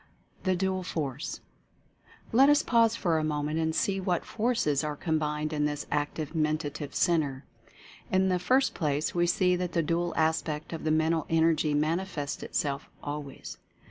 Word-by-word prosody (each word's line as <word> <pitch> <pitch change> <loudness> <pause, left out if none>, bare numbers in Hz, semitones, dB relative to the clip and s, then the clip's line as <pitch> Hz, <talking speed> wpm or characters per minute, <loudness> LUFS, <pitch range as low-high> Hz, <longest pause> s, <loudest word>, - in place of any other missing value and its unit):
THE 185 -1 +3
DUAL 190 +1 0
FORCE. 150 -5 -4 0.9
Let 270 +5 +6
us 295 +1 +5
pause 230 -2 +3
for 170 -7 +1
a - - -1
moment 150 +1 -1
and 160 0 0
see 195 -1 +1
what 180 -2 -1
Forces 215 - 0
are 150 -1 -2
combined 155 -1 -1
in 150 -1 +1
this 145 0 -2
Active 145 +1 -2
Mentative 150 -2 -2
Centre. 145 -6 +1 0.7
In 190 0 +3
the 180 -1 +1
first 255 +10 +2
place 150 -2 -1
we 175 0 +2
see 180 +1 +3
that 180 -1 -3
the 170 - +2
dual 170 +2 -1
aspect 155 -1 0
of 160 - -6
the - - +2
Men 160 +1 +3
tal 160 -3 -1
Energy 160 -2 +2
manifests 155 0 -1
itself 140 -1 -2
always. 145 -1 -6
160 Hz, 165 wpm, -28 LUFS, 150-180 Hz, 0.9 s, Let